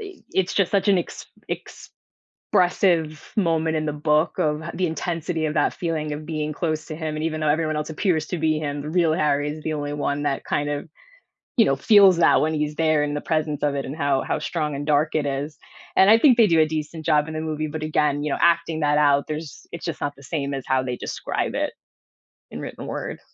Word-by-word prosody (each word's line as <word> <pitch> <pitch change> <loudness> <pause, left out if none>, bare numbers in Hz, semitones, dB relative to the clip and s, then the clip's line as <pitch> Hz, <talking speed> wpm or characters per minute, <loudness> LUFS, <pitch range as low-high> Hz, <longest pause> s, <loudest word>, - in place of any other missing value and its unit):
i 395 -3 -8 0.2
it's 190 -1 0
just 195 -3 +2
such 200 +1 +2
an 195 -2 +5
ex 175 - -5 1.1
expressive 170 -4 +1
moment 165 -4 +1
in 155 - -1
the 150 - -1
book 150 +2 +1
of 150 0 0
the 185 - 0
intensity 165 -1 -2
of 150 - -2
that 155 - +1
feeling 155 -3 -2
of 150 +1 -5
being 155 -1 -3
close 155 0 -2
to 155 - -6
him, 155 -1 -4
and 155 - -3
even 155 -1 -2
though 155 - +1
everyone 155 0 +1
else 150 +1 -3
appears 160 -1 0
to 180 - -3
be 155 -1 +1
him, 145 -1 -3
the 150 - -5
real 170 -1 +2
Harry 150 -2 +1
is 155 +1 -7
the 160 - -1
only 145 -1 -3
one 145 0 -2
that 140 -2 -1
kind 145 0 -1
of, 145 0 -4 0.7
you 225 - +6
know, 135 - +2
feels 195 +4 +6
that 170 - +5
when 155 +1 +1
he's 150 0 -1
there 155 -1 +2
in 145 0 -2
the 145 - -3
presence 155 -2 -1
of 145 -1 +1
it 140 - -2
and 135 - -6
how 140 -3 +1
how - - -2
strong 155 -5 -2
and 145 +2 -5
dark 150 +1 +2
it 150 -2 +1
is, 140 +2 -3 0.4
and 190 - +6
I 220 - +8
think 250 0 +5
they 230 -3 +6
do 165 -3 +3
a 155 - +6
decent 155 +1 -5
job 150 -1 +3
in 160 - -6
the 155 - -2
movie, 155 -1 -3
but 155 +1 -5
again, 150 -2 +1
you 150 - -2
know, - - -1
acting 170 -1 +2
that 150 0 +2
out, 145 -1 +3
there's 155 0 -7
it's 170 - -7
just 170 - -4
not 145 0 -2
the 140 - -16
same 140 -1 -3
as 135 - -5
how 130 0 +2
they 125 -1 -3
describe - - -3
it - - -1 0.8
in - - -6
written - - -7
word. - - -5
155 Hz, 240 wpm, -23 LUFS, 150-165 Hz, 1.1 s, I